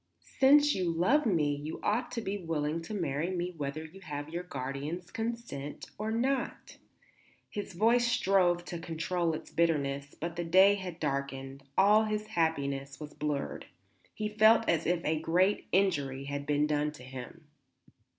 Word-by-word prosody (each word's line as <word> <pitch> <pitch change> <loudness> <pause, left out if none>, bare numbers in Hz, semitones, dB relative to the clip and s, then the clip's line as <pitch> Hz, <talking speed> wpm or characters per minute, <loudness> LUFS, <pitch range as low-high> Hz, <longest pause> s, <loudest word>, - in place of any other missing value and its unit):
"Since 290 +2 +6
you 185 -2 0
love 225 - +3
me 150 -7 +2
you 150 +2 -6
ought 230 +4 0
to 230 - -2
be 200 -2 -3
willing 165 -2 -2
to 165 +6 -7
marry 160 -2 -1
me 180 -1 -2
whether 150 +1 -4
you 185 +5 -13
have 145 -3 -6
your 170 +2 -3
guardian's 145 +2 -5
consent 225 -11 -5
or 215 +1 -2
not." 255 +5 -1 0.7
His 205 -1 -5
voice 235 +6 +3
strove 185 -6 +2
to 175 -1 -5
control 165 0 -1
its - - -9
bitterness; 145 -4 0
but 170 +1 -4
the 175 - -1
day 190 +4 +6
had 185 -4 -5
darkened; 140 -2 -3 0.2
all 210 +3 +6
his 215 0 -2
happiness 140 -6 -1
was 150 -1 -8
blurred. 145 -2 -3 0.5
He 215 - -2
felt 220 +2 +5
as 165 -1 +1
if 175 0 0
a 155 0 +1
great 180 +5 +2
injury 145 -9 +1
had 140 0 -5
been 150 0 +2
done 150 0 0
him. 130 +3 -10
170 Hz, 160 wpm, -31 LUFS, 145-200 Hz, 0.7 s, Since